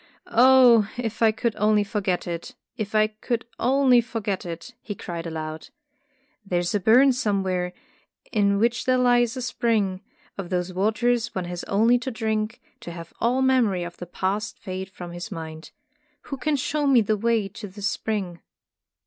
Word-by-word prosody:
'' - - -34
Oh, 245 -3 +6
if 225 -2 -4
I 225 -1 +6
could 225 +1 -2
only 210 0 +3
forget 200 -3 -2
it, 170 -1 -6 0.2
if 215 0 -4
I 215 0 +5
could 215 +2 -3
only 255 -1 +4
forget 215 -6 -4
it!" 170 +9 -7
he 205 - -6
cried 170 -2 -6
aloud. 155 -1 -6 0.7
''There 185 -3 -1
is 175 0 -1
a 205 - +2
burn 250 +7 +5
somewhere, 190 -6 -1 0.6
in 200 -2 +2
which 230 +2 +1
there 255 0 +3
lies 245 0 +3
a 255 - -3
spring, 220 -6 0 0.4
of 185 -3 -5
whose 180 0 -2
waters 230 +4 0
one 185 -2 -2
has 175 0 -5
only 230 +5 +3
to 255 - -4
drink, 220 -1 -2 0.2
to 205 -7 -8
have 165 -1 -9
all 250 +3 +2
memory 235 -9 +2
of 175 0 -8
the 175 - -8
past 200 +5 -2
fade 190 -2 -6
from 175 -2 -9
his 175 +5 -7
mind. 160 -2 -7 0.6
Who - - -2
can 305 +3 0
show 290 +2 -1
me 260 -4 +6
the 215 0 +1
way 225 -1 +1
to 205 +2 -8
this 200 +1 -4
spring?" 195 -6 -3
215 Hz, 175 wpm, -24 LUFS, 185-235 Hz, 0.7 s, Oh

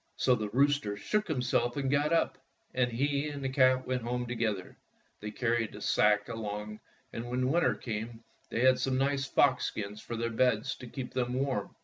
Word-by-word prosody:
So 130 - +3
the 110 -3 -1
rooster 135 -3 +2
shook 210 - -1
himself 125 -4 0
and 135 -1 0
got 145 +2 +2
up, 165 - +1 0.3
and 125 -1 +1
he 140 +4 0
and 145 -2 -6
the 135 - 0
cat 130 -1 +3
went 130 -1 -1
home 120 +1 -2
together. 115 -6 -2 0.4
They 105 - -5
carried 115 0 0
the - - -9
sack 105 0 +3
along, 105 -2 -5 0.3
and 115 +1 -5
when 125 +1 0
winter 170 +2 +3
came 115 0 -5 0.3
they 115 - -1
had 130 0 +5
some 130 -1 0
nice 135 0 +1
fox 135 -2 +3
skins 105 0 -5
on 115 - -2
their 115 0 -1
beds 125 +2 +2
to 125 - -9
keep 125 +1 -6
them 125 -1 -1
warm. 135 0 -2
125 Hz, 195 wpm, -30 LUFS, 115-135 Hz, 0.4 s, had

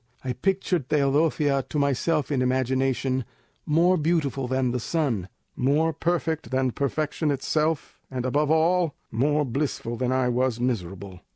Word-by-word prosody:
I 130 -1 -2
pictured 180 -1 -1
Teodosia 145 0 +2
to - - -3
myself 145 +2 +1
in 135 -3 +1
imagination, 130 0 0 0.4
more 170 +4 +4
beautiful 150 -5 0
than 130 -1 0
the 125 - -1
sun, 120 - -1 0.3
more 150 +5 +2
perfect 165 0 -1
than 130 -1 +1
perfection 150 +4 -1
itself, 150 +2 -1
and 130 -1 -3
above 145 +3 +1
all, 165 0 +2 0.2
more 145 +6 +1
blissful 125 -3 -2
than 125 0 0
I 130 -1 +2
was 125 -1 0
miserable. 95 -6 -3
140 Hz, 135 wpm, -25 LUFS, 125-155 Hz, 0.4 s, more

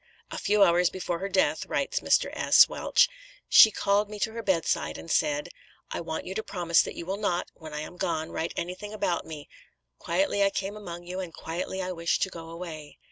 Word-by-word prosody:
"A - - -4
few 210 0 +3
hours 175 -1 +4
before 180 -2 -4
her 195 +2 -3
death," 190 -1 +1
writes - - -1
Mr. - - +2
S. - - +6
Welsh - - +3 0.4
"she 220 - +9
called 205 0 +1
me 210 - -7
to 220 - 0
her 230 +1 -5
bedside 185 -6 0
and 165 - -7
said, 295 0 +1 0.4
'I - - -3
want 160 -1 -4
you 190 - -5
to 220 - -2
promise 175 -5 +2
that - - -5
you 170 - -6
will 190 +3 -3
not, 180 -4 -1
when 160 -2 -11
I 150 - -3
am 175 - -9
gone, 160 -2 -2
write 165 - -3
anything 185 +4 -5
about 180 -5 -1
me; 150 -2 -8 0.5
quietly 195 +3 +1
I 195 - +4
came 195 +1 -4
among 175 -5 -8
you 180 +2 -5
and, 180 -3 -5
quietly 180 +4 -4
I 185 - -3
wish 170 -1 0
to 190 - 0
go 165 -2 -9
away.'" 165 -3 -8
180 Hz, 215 wpm, -27 LUFS, 170-200 Hz, 0.5 s, she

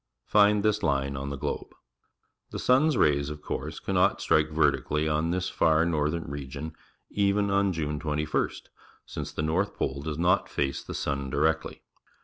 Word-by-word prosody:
Find 105 0 +4
this 105 0 +2
line 70 -4 0
on 70 +1 -4
the 70 - -4
globe. - - -4 0.8
The - - -6
sun's 135 +2 +3
rays, 70 -1 +3
of 75 0 -8
course, - - -4
cannot - - +1
strike 75 -1 +2
vertically 75 0 +1
on 75 +2 0
this 90 +1 -1
far 80 -2 +3
northern 80 0 0
region 70 +2 -6 0.4
even 100 0 +1
on 100 0 +2
June 75 -3 -2
21st, 75 0 -2 0.4
since - - -6
the 75 - -3
north 90 +6 0
pole 70 +1 -2
does 75 0 -4
not 90 +3 +2
face 70 -1 -1
the - - -7
sun 70 -2 -2
directly. 80 +3 0
80 Hz, 160 wpm, -27 LUFS, 70-90 Hz, 0.8 s, Find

